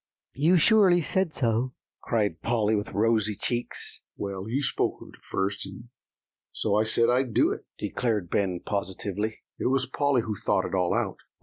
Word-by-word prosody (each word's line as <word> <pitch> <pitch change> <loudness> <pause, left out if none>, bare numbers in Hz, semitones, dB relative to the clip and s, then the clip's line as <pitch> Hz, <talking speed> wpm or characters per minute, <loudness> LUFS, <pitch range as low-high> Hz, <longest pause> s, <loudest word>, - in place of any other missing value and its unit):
you 160 +6 +4
surely 190 0 +5
said 185 +1 0
so," 125 -1 0 0.3
cried 105 -8 0
Polly, 110 -2 +1
with 105 0 -2
rosy 110 -1 +2
cheeks. 120 +4 -3 0.2
"Well, 100 0 -4
you 135 +5 0
spoke - - 0
of - - -12
it - - -17
first, 100 +1 -2
and 100 +5 -11 0.6
so 105 - 0
I 105 +1 +3
said 115 +1 +2
I'd 125 -2 +1
do - - +4
it," - - -6
declared 110 -8 -1
Ben 95 -4 0
positively. 100 +2 -3 0.2
"It - - 0
was 130 0 +2
Polly 135 -1 +1
who 110 - -2
thought 100 - 0
it - - -5
all 90 -2 +2
out." - - -1
110 Hz, 175 wpm, -27 LUFS, 100-130 Hz, 0.6 s, surely